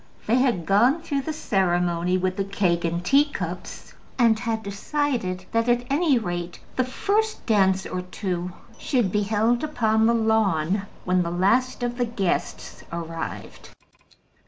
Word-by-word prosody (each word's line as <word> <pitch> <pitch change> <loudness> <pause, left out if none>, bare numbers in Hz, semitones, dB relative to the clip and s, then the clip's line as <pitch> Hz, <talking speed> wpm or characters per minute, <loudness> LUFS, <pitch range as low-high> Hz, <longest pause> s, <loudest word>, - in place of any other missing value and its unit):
They 230 +3 +3
had 245 -10 +1
gone 245 - +3
through 285 -4 -1
the 315 - -4
ceremony 180 - +1
with 185 0 -1
the 195 - -1
cake 190 -3 0
and 170 +1 -2
teacups, 285 +6 -1 0.2
and 230 -3 +4
had 225 -2 -2
decided 200 -3 -2
that, 230 +1 +1
at 240 0 +2
any 295 -2 +3
rate, 175 -5 -4 0.2
the 255 - +2
first 415 - -1
dance 190 -3 +3
or 180 - -3
two 180 -1 -4 0.3
should 240 -8 0
be 210 - +1
held 220 +4 +1
upon 220 -7 +2
the 235 - +3
lawn 200 -4 +1 0.2
when 180 0 +2
the 170 - -1
last 230 +9 +1
of 240 0 -2
the 245 - +2
guests 200 -6 -3
arrived. 165 -1 -6
210 Hz, 150 wpm, -24 LUFS, 180-245 Hz, 0.3 s, and